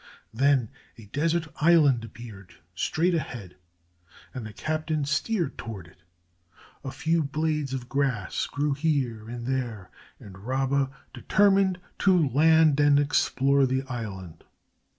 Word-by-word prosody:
Then 130 -1 +2 0.3
a 115 - -13
desert 160 +8 -1
island 150 -7 +4
appeared 110 -5 -11 0.2
straight 165 - 0
ahead, 125 - -4 0.8
and 125 -4 -6
the - - -9
captain 155 +3 -2
steered 170 +6 -1
toward 105 -7 -7
it. 85 +1 -20 0.8
A 135 - -4
few 165 +4 0
blades 150 -1 -2
of 130 -2 -5
grass 130 -8 -1
grew 145 0 -1
here 135 -7 -1
and 120 0 -6
there, 120 -7 -3 0.3
and 95 -1 -12
Rabba 135 +4 0 0.2
determined 195 -2 +2 0.2
to 180 -7 +3
land 155 +1 +4
and 145 -1 +5
explore 140 -1 +2
the 130 +1 -1
island. 100 - -7
135 Hz, 125 wpm, -26 LUFS, 115-155 Hz, 0.8 s, and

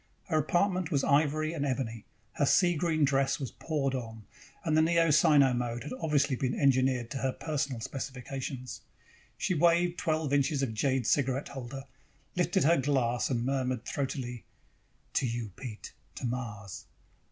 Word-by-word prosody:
Her 155 -2 +3
apartment 180 +3 +1
was 140 -5 +1
ivory 155 +2 +2
and 150 -4 -2
ebony, 120 -5 -2 0.3
her 145 - +1
sea 175 +2 +4
green 155 -1 +2
dress 135 0 +1
was 135 -4 -4
poured 145 -4 -2
on, 115 -4 -5 0.4
and 160 -2 +2
the 155 - +5
Neo 165 0 +3
Sino 145 -4 +5
mode 120 -1 -2
had 150 - -6
obviously 145 -3 +1
been 125 0 -2
engineered 130 -3 +2
to 135 - -3
her 135 0 0
personal 140 -5 -3
specifications. 130 0 -5 0.6
She - - 0
waved 175 +1 +3
twelve 155 -3 0
inches 140 0 +2
of 120 -5 -1
jade 130 +2 0
cigarette 135 +2 +1
holder, 135 0 -7 0.5
lifted 175 -4 +2
her 165 +4 +5
glass 130 -3 +1
and 120 -3 0
murmured 130 -3 -1
throatily: 130 -4 -3 0.7
"To 130 - +1
you, 115 -3 -4
Pete. 115 -5 -8 0.2
To - - -5
Mars." 115 -6 -5
135 Hz, 155 wpm, -30 LUFS, 125-155 Hz, 0.7 s, the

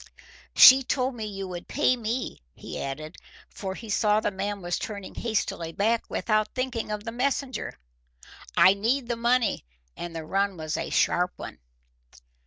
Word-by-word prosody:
She 260 +1 +10
told 260 0 -1
me 225 -3 -5
you 195 -2 -5
would 175 -1 -7
pay 265 -2 +2
me," 235 - -3
he - - -7
added, 155 +4 -6 0.3
for 190 -2 -5
he 230 - -9
saw 210 0 +3
the 215 - -1
man 200 +1 -3
was 175 0 -1
turning 200 -3 -6
hastily 200 -7 -2
back, 225 +5 0
without 215 -1 0
thinking 255 -4 -2
of 210 -1 -3
the 230 - -5
messenger. 260 +2 -2 0.8
"I 190 - +8
need 235 +6 0
the 240 - -1
money, 235 0 +1 0.3
and 170 -1 -7
the 160 -1 -5
run 195 +2 0
was 155 -1 -3
a - - -3
sharp 180 +1 +2
one." - - -9
215 Hz, 165 wpm, -26 LUFS, 190-240 Hz, 0.8 s, She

